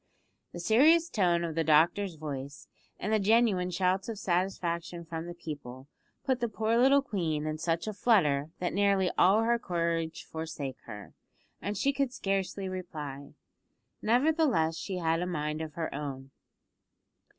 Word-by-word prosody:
The 175 - -7
serious 310 - +4
tone 175 -5 +2
of 165 -1 -3
the 165 +1 0
doctor's 165 +5 +3
voice, 145 -2 -7 0.3
and 210 +3 -2
the 215 - +4
genuine 205 -3 +3
shouts 185 +3 0
of 225 - -4
satisfaction 175 -2 -2
from 165 +1 -5
the 175 - -7
people, 140 -6 -8 0.4
put 260 -2 +1
the 235 -2 -1
poor 220 +2 0
little 270 +3 +5
queen 165 - -2
in 155 0 -3
such 165 0 -1
a 215 - -2
flutter 155 - +2
that 180 - -2
nearly 200 -2 +2
all 200 +5 +5
her 235 +1 +2
courage 165 -4 -2
forsook 160 -5 -6
her, 105 -1 -9 0.5
and 205 0 -3
she 275 +7 +1
could 275 -2 0
scarcely 195 -5 -2
reply. 150 -7 -7 0.7
Nevertheless, 245 - +2
she 190 +2 -4
had 165 -1 0
a 180 - -1
mind 150 -2 -2
of 160 -1 -6
her 165 -2 -4
own. 135 -2 -6
175 Hz, 155 wpm, -30 LUFS, 160-210 Hz, 0.7 s, little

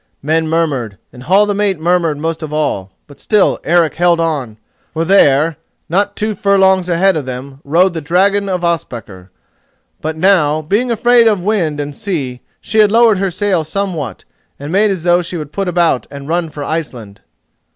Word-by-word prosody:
Men 160 +2 0
murmured, 145 -10 -1 0.2
and 125 - -12
Hall 190 +10 +3
the 205 - -1
mate 200 -4 0
murmured 170 -2 +1
most 160 +2 -3
of 155 -2 -6
all; 145 -11 -2 0.2
but 145 -2 -17
still 210 -3 +2
Eric 170 -2 +2
held 175 0 +2
on, 145 -10 -2 0.4
for 165 +1 -1
there, 155 -4 +3 0.3
not 200 +4 0
two 215 0 -2
furlongs 190 -2 +2
ahead 185 +2 +2
of 145 -4 -4
them, 135 +2 -7
rode 170 +6 +2
the 160 - -4
dragon 195 +6 +1
of 180 -2 -2
Ospakar. 115 - -4 0.7
But 160 +1 -4
now, 155 -4 +2
being 210 +10 0
afraid 235 +1 +4
of 210 -4 +1
the - - -9
wind 170 -9 0
and 145 0 -5
sea, 135 -11 -4 0.2
she 220 +1 -2
had 210 -1 +5
lowered 225 -3 +4
her 195 0 0
sail 185 -2 0
somewhat, 160 - -4 0.3
and 145 +2 -7
made 205 +3 +3
as 185 -4 -3
though 175 0 +3
she 175 0 -5
would 150 -2 -7
put 195 +2 -3
about 170 -7 +1
and 140 -1 -9
run 165 0 -1
for 150 -1 -7
Iceland. 125 -11 -5
165 Hz, 185 wpm, -15 LUFS, 145-195 Hz, 0.7 s, had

